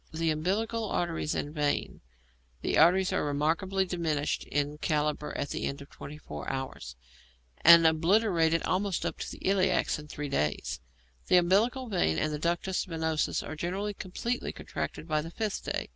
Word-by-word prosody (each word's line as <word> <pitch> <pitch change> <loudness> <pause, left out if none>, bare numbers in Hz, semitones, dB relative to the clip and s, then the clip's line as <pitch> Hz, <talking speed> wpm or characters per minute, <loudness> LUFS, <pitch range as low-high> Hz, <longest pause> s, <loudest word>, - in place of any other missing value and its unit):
The 160 0 0
umbilical 215 +8 -1
arteries 165 -3 -1
and 145 - -3
vein: 150 -2 -1 0.6
the - - 0
arteries 180 +4 +5
are - - +1
remarkably 160 +7 0
diminished 160 -5 -1
in 145 +1 -2
calibre 150 -1 0
at 140 - -2
the - - -3
end 140 - -4
of 140 - -12
twenty 150 +1 -9
four 75 - -7
hours, 130 - -5 0.7
and 170 0 +9
obliterated 165 0 +3
almost 190 -2 0
up 170 - -3
to - - -4
the - - -10
iliacs 185 -4 +2
in 150 - -10
three 150 0 -5
days; 75 - -1 0.5
the 180 - +6
umbilical 210 +9 +3
vein 80 - +1
and 155 0 0
the 150 - -3
ductus 175 +3 0
venosus 160 -2 -1
are 155 - -5
generally 190 +6 -2
completely 220 +6 -3
contracted 160 - -5
by 155 -2 +1
the 165 - -7
fifth 215 +4 -3
day. - - -3
165 Hz, 165 wpm, -29 LUFS, 150-190 Hz, 0.7 s, and